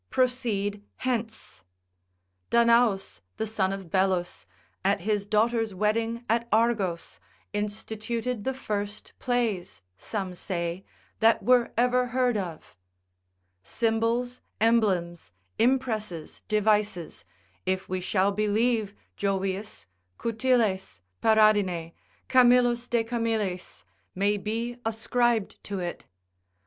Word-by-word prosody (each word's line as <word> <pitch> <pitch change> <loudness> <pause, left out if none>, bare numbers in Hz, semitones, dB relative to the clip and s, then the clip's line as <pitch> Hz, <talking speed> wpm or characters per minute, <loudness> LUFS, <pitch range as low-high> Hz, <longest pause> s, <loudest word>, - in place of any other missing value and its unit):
proceed 225 -6 0 0.2
hence. 230 - -3 0.9
Danaus, 235 -4 +3 0.2
the 220 - -1
son 200 -3 0
of 195 -4 -6
Belus, 185 -2 0 0.4
at 195 -1 +2
his 205 +1 -1
daughter's 220 0 +1
wedding 225 +4 0
at 235 +1 +1
Argos, 210 - +1 0.3
instituted 220 +3 -3
the 265 +3 -1
first 205 -4 -4
plays 225 - -1
(some 190 - -4
say) 175 0 -3 0.4
that 225 -2 +4 0.3
ever 250 +1 +3
were 250 - +1
heard 250 -1 +1
of 180 -6 -5 0.9
symbols, 230 - 0 0.2
emblems, 185 - +1 0.3
impresses, 225 -9 0
devices, 210 -5 0 0.4
if 190 0 -1
we 185 0 -2
shall 190 +2 +2
believe 215 +1 +1 0.2
Jovius, 195 +1 -2 0.3
Coutiles, 225 - 0 0.2
Paradine, 205 -6 +3 0.4
Camillus 245 -1 +4
de 235 -2 +1
Camillis, 225 -5 -2 0.3
may 205 +2 +2
be 230 +4 -3
ascribed 225 0 0
to 200 - -4
it. 175 -2 -5
215 Hz, 95 wpm, -27 LUFS, 195-235 Hz, 0.9 s, that